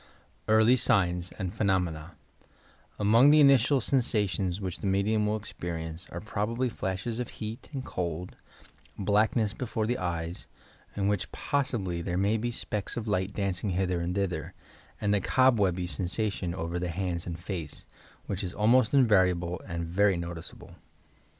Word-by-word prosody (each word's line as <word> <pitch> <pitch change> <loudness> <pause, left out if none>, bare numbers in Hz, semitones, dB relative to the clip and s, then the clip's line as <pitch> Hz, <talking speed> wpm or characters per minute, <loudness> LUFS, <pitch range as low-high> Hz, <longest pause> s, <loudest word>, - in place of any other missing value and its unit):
EAKLY 110 +2 +5
SlflNB 90 -5 +1
AND 95 -1 -3
PHENOMENA 90 -6 -1 0.8
Among 115 +7 +5
the 155 +1 +7
initial 140 -1 +5
sensations 105 -8 0
which 95 -2 -4
the - - -3
medium 105 +2 +2
will 105 - +1
experience 85 -4 -6
are, 85 - -6
probably, 110 +5 -2
flashes 105 +3 -3
of 125 - -3
heat 110 +1 -6
and 135 -3 -5
cold, 90 0 -4 0.6
black 105 +2 +2
ness 110 -4 +1
before 115 -3 -2
the 120 +3 -1
eyes 85 -1 -3 0.5
(in 100 -1 0
which 105 -2 -1
possibly 115 -12 -1
there 90 0 -2
may 100 +4 +2
be 120 +2 -2
specks 105 -1 -4
of 115 -1 -4
light 95 -1 0
dancing 100 -1 -2
hither 90 -1 0
and 90 +1 -2
thither) 90 -7 -2 0.4
and 105 0 +1
a 100 - +2
"cob 130 +2 +4
webby" 90 -2 +1
sensation 90 0 -1
over 85 0 -3
the 90 0 -2
hands 90 -1 -2
and 85 -1 -4
face, 85 -4 -6 0.4
which 100 0 -3
is 90 - -5
al 105 - 0
most 125 +2 +4
invariable 90 -8 +3
and 85 -2 -3
very 95 +3 +2
noticeable. 85 -1 -7
100 Hz, 155 wpm, -28 LUFS, 90-110 Hz, 0.8 s, the